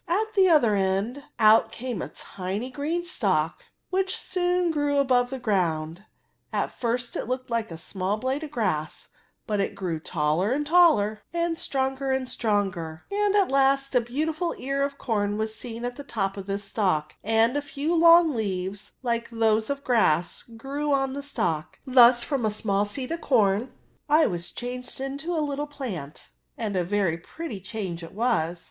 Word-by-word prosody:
At 430 +6 0
the 385 -3 +5
other 245 -10 +5
end 195 +8 -1
out 215 +1 +5
came 245 -5 -4
a - - -5
tiny 200 +7 -5
green 315 +6 -2
stalk, 485 +7 0 0.3
which 380 0 0
soon 360 -1 0
grew 290 -2 0
above 250 -3 +3
the 265 - -4
grounds 170 -8 -1 0.5
At - - -1
first 240 0 -2
it - - -2
looked 255 0 -3
like 230 -1 -1
a 165 - -7
small 190 +4 -2
blade 260 +6 -2
of 310 - -5
grass; 185 - -2 0.4
but 210 -3 -1
it 195 - -1
grew 175 -4 -3
taller 160 +7 0
and 295 +2 -1
taller, 290 -11 +4
and 340 -1 -1
stronger 270 0 -1
and 265 0 +1
•stronger, 195 -9 -1
and 410 0 +1
at 395 -7 +3
last 275 0 +3
a 250 - +4
beautiful 310 +8 -2
ear 275 +1 -2
of 280 0 -1
corn 205 -3 -1
was 220 0 -2
seen 235 +1 -6
at 245 0 -4
the 285 - -7
top 195 -8 -2
of 195 -1 -7
this 200 +1 -2
stalk, 185 -7 0
and 225 +4 +3
a 290 - +1
few 290 +3 -2
long 335 -1 +7
leaves, 195 -3 -3
like 235 -1 -1
those 220 -1 +1
of 280 0 -3
grass^ 180 - +2 0.2
grew 285 +5 -3
oa 270 -1 +2
the 280 - -4
stalk. 175 - -2
Thus 245 -2 +6
from 275 -3 -1
a 215 - +2
small 205 -1 0
seed 255 +7 -5
of 335 - -3
corn 220 -2 +2 0.4
I 310 +1 +5
was 175 -1 -2
changed 250 +1 -5
into 280 +6 -3
a 310 -2 +1
little 290 +1 -3
plant; 205 - -7 0.3
and 215 -4 -3
a 180 - +2
very 180 -3 0
pretty 305 - -7
change 190 -3 -5
it 165 - -10
was. 190 -7 0
240 Hz, 180 wpm, -26 LUFS, 200-285 Hz, 0.5 s, long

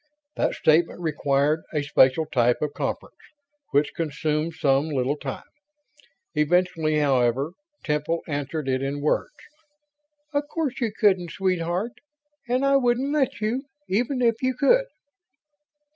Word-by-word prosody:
That - - 0
statement 165 +3 +2
required 150 -1 +1
a 150 -2 0
special 140 +1 +4
type 120 -4 +2
of 150 -1 -2
conference, - - -4 0.5
which 145 +1 +1
consumed 155 0 -2
some 140 -1 +2
little 135 -1 0
time. 140 -3 -6 0.9
Eventually, 160 0 +1
however, 135 0 +2 0.3
Temple 150 +2 -1
answered 145 0 -3
it 130 0 0
in 140 +1 -3
words. 150 - +1 1.0
"Of 285 0 0
course 300 -5 -3
you 230 -3 0
couldn't, 190 -5 +2
sweetheart, 185 +3 -1 0.6
and 255 +3 +1
I 275 0 +5
wouldn't 250 +2 +1
let 270 -7 0
you, 240 +6 -1 0.2
even 245 +6 0
if 230 -1 +2
you 255 -1 0
could." - - +4
160 Hz, 130 wpm, -24 LUFS, 145-230 Hz, 1.0 s, I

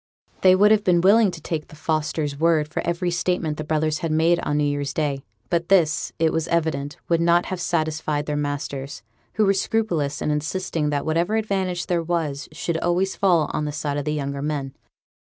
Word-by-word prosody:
They 185 -1 +6
would 205 +3 +5
have 215 -1 +4
been 175 -3 +3
willing 205 +3 +5
to 175 -2 -7
take 155 0 -4
the - - -14
Fosters' 155 -1 -1
word 160 -2 +3
for 155 - -3
every 170 +1 -1
statement 175 -3 -1
the 155 - -4
brothers 155 0 0
had 165 - -2
made 165 +2 +3
on 145 - -1
new 150 - +2
year's 145 -1 -1
day; 140 -3 -1 0.3
but 170 0 0
this, 170 -6 +3
it 160 -1 +2
was 160 0 -1
evident, 155 -4 -1
would 170 -1 +2
not 170 +1 +3
have 185 -2 -4
satisfied 155 -3 -1
their 150 - -2
masters, 145 -1 -4 0.3
who 215 - +2
were 195 - +4
scrupulous 180 -8 -1
in 150 - -1
insisting 155 +1 -1
that 145 -1 -1
whatever 170 +6 +1
advantage 190 -5 -1
there 175 -2 0
was 160 -4 -2
should 160 +1 -2
always 180 +3 0
fall 175 -6 +3
on 150 - -1
the 150 - -2
side 145 -1 -3
of 145 - -3
the 150 - 0
younger 140 -1 -3
men. 140 -2 -3
160 Hz, 205 wpm, -23 LUFS, 150-175 Hz, 0.3 s, They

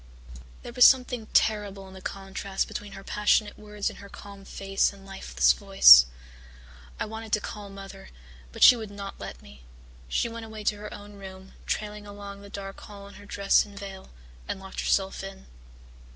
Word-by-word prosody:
"There 240 - -8
was 250 - +5
something 250 -4 +5
terrible 205 -3 +1
in 190 - -13
the 190 - -11
contrast 195 0 -4
between 205 -1 -7
her 195 - -10
passionate 210 +1 +1
words 210 -1 -4
and - - -5
her 200 - -12
calm 200 -1 -12
face 195 0 0
and 195 -1 -15
lifeless 195 0 +2
voice. 195 - +8 0.9
I - - -1
wanted 220 0 -8
to 210 - +4
call 205 -1 -8
Mother, 195 - -11 0.4
but - - 0
she 250 - +10
would 220 -3 -7
not 200 -1 -8
let - - -8
me. 70 -1 -15 0.5
She 65 - 0
went 230 -1 -8
away 220 -1 -8
to 210 0 0
her 210 +1 -8
own 205 0 -11
room, 190 -1 -11
trailing 210 -1 -3
along 200 0 -9
the 200 - -12
dark 195 -1 -8
hall 200 -1 -11
in - - -15
her 205 0 -14
dress 200 0 +3
and 205 -1 -14
veil, 195 -1 -9 0.4
and - - -4
locked 190 0 -9
herself 195 0 0
in. 195 0 -9
200 Hz, 185 wpm, -27 LUFS, 195-210 Hz, 0.9 s, she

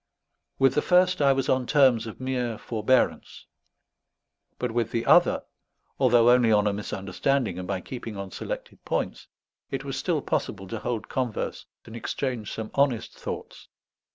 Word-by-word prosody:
With 135 0 +4
the 150 - +2
first 180 -1 +3
I 140 -1 +5
was 135 -1 0
on 130 -1 +1
terms 130 -6 +4
of 110 - -9
mere 125 -3 -2
forbearance; 115 +4 0 1.1
but - - -2
with 115 -1 0
the 115 0 -2
other, - - +5 0.6
although 120 -2 +5
only 125 -2 +5
on 105 -1 +4
a 105 - +2
misunderstanding 100 +2 -1
and 90 - -6
by 95 -1 -2
keeping 115 -3 -7
on 100 -1 -6
selected - - -6
points, - - -3 0.4
it - - -3
was - - -4
still - - -1
possible 95 0 -2
to 115 - -4
hold 115 -1 -3
converse 125 -4 -3 0.2
and 115 - -10
exchange 115 -2 -3
some 110 -1 -5
honest 135 -5 +1
thoughts. - - -7
120 Hz, 155 wpm, -26 LUFS, 105-130 Hz, 1.1 s, I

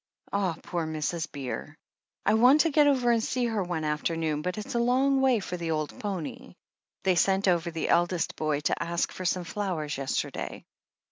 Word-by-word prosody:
"Ah, 195 -4 +1
poor 170 -3 -2
Mrs. 155 +1 -2
Beer. 135 -3 -6 0.5
I 210 - +4
want 250 +7 +6
to 330 - +2
get 295 0 +5
over 255 -4 +3
and 230 -1 +2
see 250 +1 0
her 225 -3 0
one 175 -3 -2
afternoon, 155 0 -1
but 180 +4 -3
it's 210 - -5
a 235 - +1
long 265 +3 +3
way 260 -4 +4
for 180 -2 -5
the 170 -1 -4
old 155 -2 -2
pony. 190 -7 -5 0.5
They 190 - +4
sent 195 +2 +2
over 170 -2 +2
the 165 -1 -3
eldest 175 0 +2
boy 150 -2 -1
to - - 0
ask 170 0 -1
for 185 - -7
some 180 +1 +1
flowers 170 -7 -3
yesterday." 135 -1 -3
180 Hz, 190 wpm, -28 LUFS, 160-220 Hz, 0.5 s, want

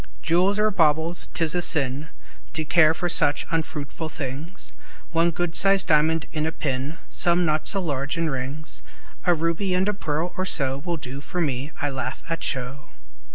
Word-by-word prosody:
Jewels 180 +5 +2
are 215 0 +2
baubles; 160 -1 +2
't 165 - 0
is 155 - +3
a 175 - +1
sin 145 -2 +3 0.5
To 155 - -2
care 160 0 +4
for 175 - -2
such 145 -4 +4
unfruitful 160 0 -3
things; 145 +5 -7 0.4
One 165 +1 +3
good 170 0 -3
sized 195 0 +5
diamond 160 0 +3
in 155 -1 -2
a - - -1
pin, 140 0 -3
Some, 175 0 +2
not 155 -1 0
so 195 - +1
large, 145 0 -2
in 165 0 0
rings, 140 +2 -5 0.4
A 175 -1 +4
ruby, 170 +4 -1
and 185 +2 +1
a 210 - +1
pearl, 165 -2 -3
or 185 - -2
so, 135 -5 +2
Will 170 +2 -3
do 135 -1 -7
for 180 - -5
me; 140 -2 -2
I 145 - 0
laugh 130 -1 -4
at 165 - -2
show. 130 +1 -2
160 Hz, 185 wpm, -24 LUFS, 145-175 Hz, 0.5 s, sized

